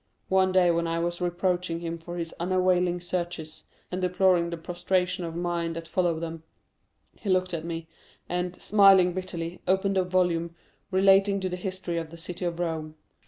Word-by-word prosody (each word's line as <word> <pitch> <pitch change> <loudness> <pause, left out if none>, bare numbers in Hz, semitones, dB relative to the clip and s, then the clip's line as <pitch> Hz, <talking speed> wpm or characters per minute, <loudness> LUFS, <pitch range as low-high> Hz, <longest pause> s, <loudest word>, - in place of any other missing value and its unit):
One 190 0 +3
day 185 -2 +5
when 170 0 0
I 165 0 -1
was 175 +1 -2
reproaching 175 -1 -1
him 170 0 -4
for 175 +2 -7
his 165 -1 -4
unavailing 180 0 +2
searches, 175 -3 -4 0.3
and 185 +1 -2
deploring 180 -1 +3
the 170 - -4
prostration 180 +2 -1
of 165 -1 -6
mind 170 -1 -2
that 165 0 -6
followed 170 -3 0
them, 165 -1 -5 0.7
he 210 - -6
looked 185 -1 +2
at 165 -1 -3
me, 165 -1 -5 0.4
and, 180 0 -2
smiling 195 -3 +6
bitterly, 180 -2 -5
opened 190 +1 +2
a - - +3
volume 175 -2 0 0.3
relating 195 +1 +4
to 185 - -1
the 180 - -3
History 185 -2 -3
of 165 -1 -6
the 170 - -11
City 180 +2 -5
of 170 0 -2
Rome. 160 -3 -3
175 Hz, 175 wpm, -27 LUFS, 170-185 Hz, 0.7 s, smiling